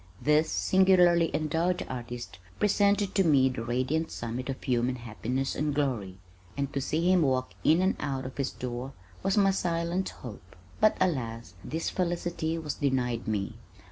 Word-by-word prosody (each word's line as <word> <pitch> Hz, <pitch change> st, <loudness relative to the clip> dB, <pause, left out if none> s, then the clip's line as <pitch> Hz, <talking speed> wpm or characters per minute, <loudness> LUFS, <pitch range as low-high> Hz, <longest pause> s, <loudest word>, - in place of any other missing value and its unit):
This 150 Hz, +2 st, +3 dB
singularly 180 Hz, -3 st, +4 dB
endowed 165 Hz, +4 st, 0 dB
artist 120 Hz, -5 st, -6 dB, 0.2 s
presented 205 Hz, -1 st, +2 dB
to 195 Hz, -, +3 dB
me 140 Hz, -6 st, +4 dB
the 125 Hz, -3 st, -4 dB
radiant 130 Hz, +7 st, -1 dB
summit 120 Hz, +3 st, -5 dB
of 135 Hz, -, -5 dB
human 125 Hz, 0 st, +1 dB
happiness 120 Hz, +3 st, -3 dB
and 150 Hz, 0 st, -1 dB
glory, 115 Hz, -11 st, -1 dB, 0.4 s
and 140 Hz, -1 st, -2 dB
to 140 Hz, -, -1 dB
see 165 Hz, +6 st, +1 dB
him 185 Hz, -2 st, +4 dB
walk 130 Hz, -3 st, +1 dB
in 165 Hz, +4 st, +4 dB
or 190 Hz, -, +2 dB
out 135 Hz, -2 st, -3 dB
of 130 Hz, -, -7 dB
his 140 Hz, -2 st, 0 dB
door 125 Hz, +2 st, -5 dB, 0.3 s
was 195 Hz, +2 st, 0 dB
my 195 Hz, -1 st, +5 dB
silent 175 Hz, 0 st, -1 dB
hope, 100 Hz, -8 st, -11 dB, 0.2 s
but 215 Hz, -, +4 dB
alas, 115 Hz, -, -1 dB
this 165 Hz, +2 st, -3 dB
felicity 175 Hz, -2 st, -1 dB
was 155 Hz, -3 st, -3 dB
denied 125 Hz, -5 st, -1 dB
me! 105 Hz, -3 st, -2 dB
140 Hz, 160 wpm, -28 LUFS, 125-175 Hz, 0.4 s, my